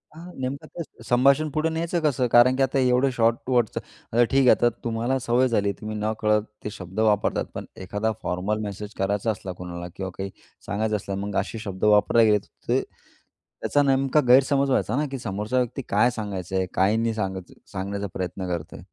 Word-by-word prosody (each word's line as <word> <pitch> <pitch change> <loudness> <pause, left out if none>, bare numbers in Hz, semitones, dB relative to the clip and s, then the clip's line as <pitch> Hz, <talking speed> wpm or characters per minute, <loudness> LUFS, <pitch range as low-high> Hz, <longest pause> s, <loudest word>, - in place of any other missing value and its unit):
आह, 175 +2 -10
नेमकं 130 +2 -4
ते 160 -8 -9
संभाषण 140 +6 +3
पुढे 155 +3 0
न्यायचं 165 +2 -1
कसं? 135 -5 +1
कारण 125 +2 +6
की 135 - +2
आता 135 +1 +1
एवढं 130 +1 +3
शॉर्ट 115 -1 +2
वर्डच 120 -4 +1
आता 120 +2 -1
ठीक 135 +3 +2
आहे 130 - +5
आता 120 - +5
तुम्हाला 120 +3 0
सवय 125 +1 +2
झाली 105 -4 +1
तुम्ही 110 0 -5
न 105 +1 -1
कळत 105 0 +3 0.2
ते - - -3
शब्द 95 +3 -7
वापरतात. 105 -2 +2
पण - - -5 0.2
एखादा 105 +4 -1
फॉर्मल 95 +4 -1
मेसेज 105 +1 -6
करायचा 100 +3 0
असला 95 -2 -6
कुणाला 85 -1 -6
किंवा 95 -1 -4
काही 95 0 -3 0.4
सांगायचं 110 +1 -1
असलं 100 -1 -4
मग 100 -1 -5
असे 110 +3 -4
शब्द 95 -3 -7
वापरले 105 +2 +5
गेले 105 -1 +5
अ, - - -4 0.3
ते - - +2
त्याचा 145 - -5
नेमका 135 +1 +3
गैरसमज 135 +2 +5
व्हायचा 125 -3 +1
ना 150 +3 +1
की 135 - -3
समोरचा 105 +2 -2
व्यक्ती 125 +2 -2
काय 105 +5 +4
सांगायचंय, 95 -4 -3
काय 95 +3 +3
नाही 115 0 0
सांगायचा 95 -4 -4 0.2
सांगण्याचा 100 +1 -3
प्रयत्न 95 0 -4
करतोय? 85 -3 -5
110 Hz, 190 wpm, -25 LUFS, 100-130 Hz, 0.4 s, कारण